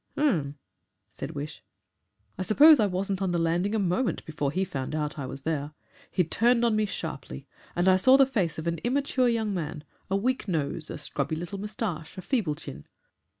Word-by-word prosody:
"Um," 160 - +1 0.6
said - - -7
Wish. 145 +1 -6 0.7
"I - - -6
suppose 290 +10 +7
I 210 - +4
wasn't 195 +1 -2
on 190 - +1
the 175 - 0
landing 175 +5 +1
a - - +2
moment 195 +5 0
before 150 -3 -2
he 190 +5 0
found 135 -3 -4
out 150 -1 -2
I 135 - -4
was 135 - -8
there. 150 -1 -2 0.4
He 180 - +2
turned 235 +8 +3
on 230 -2 +2
me 215 0 +1
sharply, 65 - -6 0.3
and 175 +1 +1
I 185 0 +6
saw 260 +8 +6
the 275 - +7
face 205 - -1
of 160 - -5
an 170 -1 -1
immature 255 - +1
young 220 -3 0
man, 155 -4 -4 0.3
a 190 - +1
weak 255 +3 -1
nose, 155 -2 -2
a - - -5
scrubby 145 0 -2
little 175 +5 -5
moustache, 200 -7 -4
a 185 - -6
feeble 205 - 0
chin. 70 - -10
185 Hz, 195 wpm, -27 LUFS, 155-220 Hz, 0.7 s, suppose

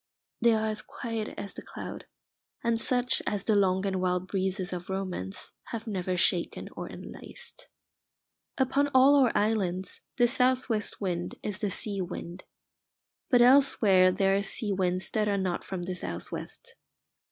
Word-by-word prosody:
They 235 -1 +5
are 220 0 0
as 215 0 -2
quiet 225 -2 -5
as 200 -1 -6
the - - -8
cloud, - - -8 0.6
and 230 -1 +1
such 250 0 +1
as 205 - -1
the 215 - +2
long 190 -1 +3
and 190 -2 -1
wild 180 0 0
breezes 190 -1 -2
of 180 +1 -6
Romance 185 - -4
have 225 -1 -6
never 185 -4 -2
shaken 175 -1 +1
or - - -5
enlaced. - - -9 0.9
Upon 280 +2 +2
all 265 +2 +7
our 270 -4 +5
islands 195 -4 +1 0.2
this 240 -1 +4
south 255 0 +2
west 215 -2 -1
wind 175 -3 -2
is 210 -1 -3
the 205 - 0
sea 200 0 -3
wind. 175 0 -6 0.8
But 245 -2 +6
elsewhere 235 -8 +6
there 195 +1 +2
are 200 - +2
sea 205 +1 0
winds 185 -1 0
that 215 -1 +1
are 200 -1 +1
not 185 -2 -1
from 185 -2 -5
the 185 +1 -3
south 90 - -6
west. - - -7
200 Hz, 165 wpm, -29 LUFS, 185-230 Hz, 0.9 s, all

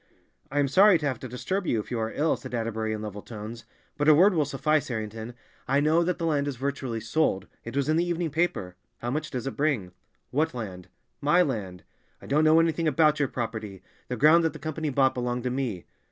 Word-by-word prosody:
"I 145 - -4
am 145 -1 +3
sorry 190 +7 +6
to 155 - -5
have 135 -2 -1
to 130 - -6
disturb 180 - -3
you 115 - +1
if 105 - -7
you 120 - -1
are 110 0 -2
ill," 155 +2 +1
said 130 -3 -7
Atterbury 110 -1 -2
in 110 0 -4
level 105 -1 -6
tones, 110 +1 -8 0.3
"but 145 - +1
a 155 - +8
word 190 +6 +6
will 155 -4 +2
suffice, 150 +1 0
Harrington. 110 0 -5 0.3
I 140 +2 +3
know 155 +3 +3
that 180 +1 -1
the 170 - -2
land 145 -3 +1
is 140 - -2
virtually 130 -2 -3
sold—it 115 -2 -2
was 140 - +1
in 155 +1 +2
the 170 - +3
evening 175 -2 -2
paper. 140 - -1 0.2
How 120 - -4
much 150 +2 -2
does 125 -4 -4
it 135 - -4
bring?" 135 -12 0 0.4
"What 150 +1 0
land?" 95 -6 -6 0.3
"My 170 +5 +4
land." 100 - -4 0.4
"I - - -13
don't 150 +3 +2
know 155 +1 +6
anything 165 0 +1
about 155 0 +3
your 140 - +2
property; 110 -6 -5 0.2
the 125 - -3
ground 155 +6 +6
that 160 - +1
the - - -8
Company 155 +1 -3
bought 135 -1 +3
belonged 125 -1 -2
to 125 - -1
me." 125 -9 -3
135 Hz, 225 wpm, -27 LUFS, 115-155 Hz, 0.4 s, a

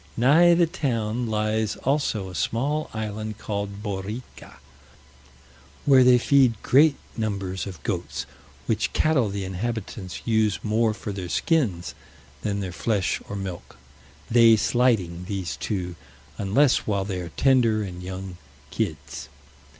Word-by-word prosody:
Nigh 160 +8 +6
the 170 0 +4
town 120 -6 -2
lies 110 0 0
also 130 -8 -1
a - - -9
small 130 - -1
island 110 -1 -4
called 100 -1 -4
Borrica, 105 +4 -6 1.3
where 135 -2 +7
they 125 0 +7
feed 125 -3 +3
great 145 +3 +5 0.2
numbers 100 -4 -3
of 90 -8 -9
goats, - - -3 0.4
which - - 0
cattle 140 -8 +2
the 100 -1 -3
inhabitants 100 -1 -5
use 110 -3 +2
more 110 0 +1
for 105 - -6
their 95 -3 -5
skins 110 - 0 0.5
than 100 -1 -2
their 95 -2 -4
flesh 95 -1 -1
or 100 - -4
milk; 95 -3 -7 0.5
they 115 -1 +6
slighting 105 -8 +1
these 95 -5 -3
two, 90 -4 -3 0.4
unless 115 +8 +3
while 100 -2 0
they 95 -2 -3
are 85 - -6
tender 120 -5 +3
and 90 -2 -7
young 95 0 -7 0.3
kids. 75 -2 -4
105 Hz, 130 wpm, -25 LUFS, 95-120 Hz, 1.3 s, where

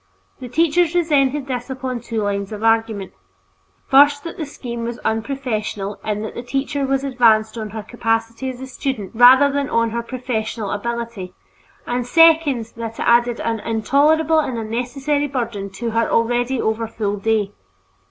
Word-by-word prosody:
The 250 - -8
teachers 330 +4 +2
resented 295 -5 +2
this 250 -2 -4
upon 260 -1 -4
two 225 -2 -3
lines 200 0 -2
of 210 0 -6
argument: 225 -3 +1 0.7
first, 285 +1 +5
that 335 - -6
the 310 - -5
scheme 235 -4 -6
was 235 0 -4
unprofessional 220 -4 -3
in 210 0 -2
that 220 - -6
the - - -5
teacher 275 +2 -2
was 270 0 0
advanced 230 -5 +3
on 220 -2 -5
her 215 +1 -6
capacity 230 +2 -2
as 255 -1 -7
a 265 - -6
student 255 -5 -4
rather 260 +4 +7
than 280 0 -1
on 230 -1 +1
her 235 +1 -2
professional 230 -4 -4
ability; 230 -4 -4 0.5
and, 245 0 -2
second, 315 -7 +4
that 230 -1 -6
it - - -2
added 240 0 +3
an 230 -1 -1
intolerable 290 +9 +2
and 260 -6 -2
unnecessary 260 +6 -2
burden 230 -7 -4
to 225 +4 -4
her 230 +1 +1
already 245 +2 +1
overfull 220 -2 -2
day. 210 -1 0
235 Hz, 160 wpm, -20 LUFS, 220-270 Hz, 0.7 s, rather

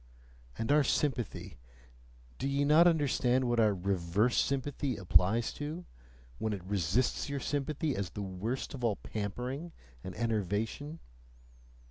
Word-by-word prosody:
And 115 - -1
our 150 0 +6
sympathy 125 - -1 0.8
do - - -1
ye 140 +1 +1
not 155 +4 +7
understand 130 -5 +2
what 120 -1 +2
our 105 -3 +4
REVERSE 95 +4 +1
sympathy 140 -1 0
applies 95 +5 +3
to, 155 +4 -5 0.5
when 110 -1 -1
it 95 -3 -5
resists 100 - 0
your 140 0 -2
sympathy 145 +2 -1
as 100 -2 -2
the 105 - -5
worst 100 +10 -3
of 130 -3 -7
all 110 -4 +2
pampering 125 - -4 0.3
and 95 - -6
enervation? 110 - -1
120 Hz, 130 wpm, -32 LUFS, 100-140 Hz, 0.8 s, not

